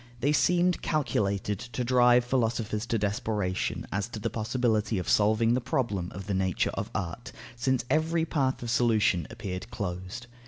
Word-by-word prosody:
They 140 Hz, +4 st, +2 dB
seemed 175 Hz, +3 st, +3 dB
calculated 105 Hz, -, 0 dB
to 120 Hz, +2 st, -4 dB
drive 125 Hz, 0 st, +5 dB
philosophers 115 Hz, -3 st, -1 dB
to 115 Hz, -, +1 dB
desperation 105 Hz, -2 st, -1 dB
as 100 Hz, +1 st, -1 dB
to 115 Hz, -, -7 dB
the -, -, -2 dB
possibility 110 Hz, -1 st, 0 dB
of 90 Hz, -, -3 dB
solving 110 Hz, +2 st, +3 dB
the 125 Hz, -, +1 dB
problem 115 Hz, -8 st, -1 dB
of 95 Hz, 0 st, -6 dB
the 100 Hz, -, -2 dB
nature 95 Hz, -2 st, +1 dB
of -, -, -3 dB
art, 90 Hz, -4 st, -4 dB, 0.2 s
since 125 Hz, 0 st, 0 dB
every 160 Hz, +4 st, +1 dB
path 135 Hz, -6 st, 0 dB
of 115 Hz, -, -2 dB
solution 110 Hz, -9 st, +2 dB
appeared 95 Hz, -4 st, -6 dB
closed. 95 Hz, +5 st, -5 dB
115 Hz, 160 wpm, -28 LUFS, 100-125 Hz, 0.2 s, drive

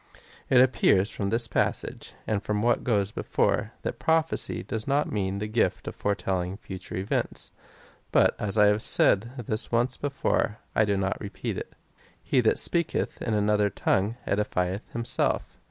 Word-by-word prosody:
It 130 Hz, -, +6 dB
appears 110 Hz, -6 st, +3 dB
from 100 Hz, -2 st, -3 dB
this 115 Hz, +2 st, +2 dB
passage, -, -, -2 dB
and 105 Hz, -2 st, -1 dB
from 105 Hz, 0 st, -1 dB
what 120 Hz, 0 st, +2 dB
goes 105 Hz, -4 st, +1 dB
before, -, -, 0 dB
that -, -, -4 dB
prophecy 160 Hz, 0 st, 0 dB
does 110 Hz, -1 st, -4 dB
not 140 Hz, +2 st, +1 dB
mean 100 Hz, -2 st, -1 dB
the 105 Hz, -, -3 dB
gift 110 Hz, +2 st, 0 dB
of -, -, -5 dB
foretelling 95 Hz, -2 st, -2 dB
future 95 Hz, -3 st, -8 dB
events: 95 Hz, +2 st, -2 dB, 0.6 s
but -, -, +4 dB
as 105 Hz, 0 st, -1 dB
I 105 Hz, -, +6 dB
have 105 Hz, +1 st, +3 dB
said 110 Hz, 0 st, +4 dB, 0.2 s
this 110 Hz, +1 st, +1 dB
once 120 Hz, +2 st, +1 dB
before,^ 140 Hz, -6 st, 0 dB, 0.2 s
I 110 Hz, -, +3 dB
do 100 Hz, -1 st, 0 dB
not 95 Hz, 0 st, -2 dB
repeat 100 Hz, -, -4 dB
it. -, -, -7 dB
4. -, -, -33 dB, 0.5 s
He 130 Hz, -, +2 dB
that 110 Hz, -, +2 dB
speaketh 170 Hz, -2 st, 0 dB
in 110 Hz, -, -1 dB
another 105 Hz, 0 st, +2 dB
tongue, 100 Hz, +3 st, 0 dB
edifieth 100 Hz, -1 st, -1 dB
himself. 120 Hz, +1 st, -1 dB
105 Hz, 165 wpm, -27 LUFS, 100-120 Hz, 0.6 s, It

